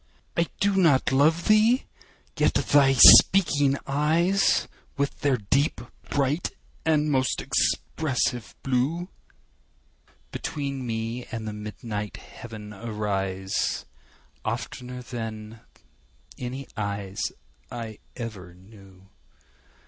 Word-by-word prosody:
I 170 Hz, 0 st, +1 dB
do 200 Hz, 0 st, +2 dB
not 150 Hz, -9 st, +3 dB
love 155 Hz, +5 st, +3 dB
thee!—yet 220 Hz, +4 st, +1 dB
thy 140 Hz, -2 st, +4 dB
speaking 145 Hz, 0 st, +7 dB
eyes, 160 Hz, +7 st, +2 dB, 0.3 s
With 140 Hz, 0 st, -2 dB
their 140 Hz, -3 st, +2 dB
deep, 135 Hz, +8 st, 0 dB, 0.3 s
bright, 145 Hz, +4 st, 0 dB, 0.3 s
and 155 Hz, -1 st, +2 dB
most 130 Hz, -2 st, +1 dB
expressive 125 Hz, -7 st, -1 dB
blue, 140 Hz, +8 st, -1 dB, 1.2 s
Between 140 Hz, -3 st, -4 dB
me 115 Hz, +2 st, -3 dB
and 110 Hz, -1 st, -6 dB
the 105 Hz, -, -4 dB
midnight 105 Hz, 0 st, -6 dB
heaven 110 Hz, -3 st, -10 dB
arise, 100 Hz, -3 st, -2 dB, 0.5 s
15 -, -, -35 dB
Oftener 125 Hz, 0 st, -5 dB
than 110 Hz, -2 st, -7 dB, 0.8 s
any 130 Hz, +2 st, -5 dB
eyes 100 Hz, -2 st, -4 dB, 0.5 s
I 115 Hz, -3 st, -7 dB, 0.2 s
ever 100 Hz, -7 st, -8 dB
knew. 95 Hz, 0 st, -17 dB
125 Hz, 95 wpm, -25 LUFS, 105-145 Hz, 1.2 s, speaking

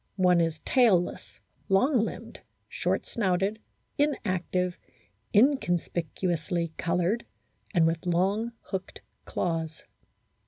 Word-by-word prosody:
One 180 Hz, -3 st, +4 dB
is 165 Hz, -1 st, 0 dB
tailless, 215 Hz, -9 st, +2 dB, 0.3 s
long 250 Hz, +8 st, +4 dB
limbed, -, -, -6 dB, 0.3 s
short -, -, -1 dB
snouted, 195 Hz, -1 st, 0 dB, 0.4 s
inactive, 185 Hz, -, 0 dB, 0.5 s
inconspicuously 175 Hz, -, +1 dB
coloured, 180 Hz, +6 st, 0 dB, 0.5 s
and 170 Hz, -2 st, +5 dB
with 165 Hz, +1 st, -1 dB
long, 195 Hz, +7 st, +1 dB
hooked 190 Hz, -2 st, -6 dB, 0.2 s
claws. 165 Hz, -2 st, -2 dB
180 Hz, 85 wpm, -28 LUFS, 170-210 Hz, 0.5 s, and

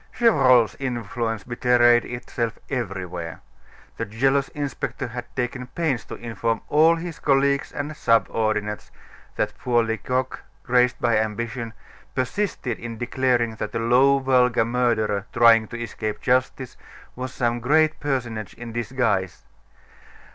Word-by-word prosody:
Gevrol's 130 Hz, -, +4 dB
influence 120 Hz, -3 st, -3 dB
betrayed 120 Hz, -1 st, +3 dB
itself 120 Hz, -2 st, -4 dB
everywhere. 90 Hz, -, -4 dB, 0.6 s
The 115 Hz, -, -2 dB
jealous 135 Hz, +6 st, +1 dB
inspector 145 Hz, -4 st, -4 dB
had 120 Hz, +1 st, -6 dB
taken 125 Hz, 0 st, -3 dB
pains 135 Hz, -7 st, -2 dB
to -, -, -7 dB
inform 115 Hz, -1 st, -2 dB
all 160 Hz, +3 st, +5 dB
his 165 Hz, -1 st, -6 dB
colleagues 140 Hz, 0 st, +2 dB
and 145 Hz, +2 st, -5 dB
subordinates 110 Hz, -4 st, 0 dB, 0.5 s
that -, -, -1 dB
poor 120 Hz, -2 st, +2 dB
Lecoq, 125 Hz, +4 st, -2 dB, 0.2 s
crazed 125 Hz, 0 st, +2 dB
by 120 Hz, -3 st, +2 dB
ambition, 115 Hz, +2 st, -3 dB, 0.4 s
persisted 130 Hz, -, -2 dB
in 115 Hz, -1 st, -6 dB
declaring 120 Hz, -1 st, 0 dB
that -, -, -5 dB
a -, -, 0 dB
low, 125 Hz, +4 st, +4 dB
vulgar 125 Hz, -3 st, +3 dB
murderer 115 Hz, -4 st, 0 dB
trying 115 Hz, -2 st, +6 dB
to 120 Hz, -, -7 dB
escape 110 Hz, -2 st, -4 dB
justice 130 Hz, 0 st, 0 dB, 0.4 s
was 125 Hz, 0 st, -5 dB
some 120 Hz, -2 st, -1 dB
great 155 Hz, +5 st, +2 dB
personage 120 Hz, -7 st, -3 dB
in 120 Hz, -1 st, -8 dB
disguise. 115 Hz, -6 st, -1 dB
120 Hz, 125 wpm, -23 LUFS, 115-130 Hz, 0.6 s, trying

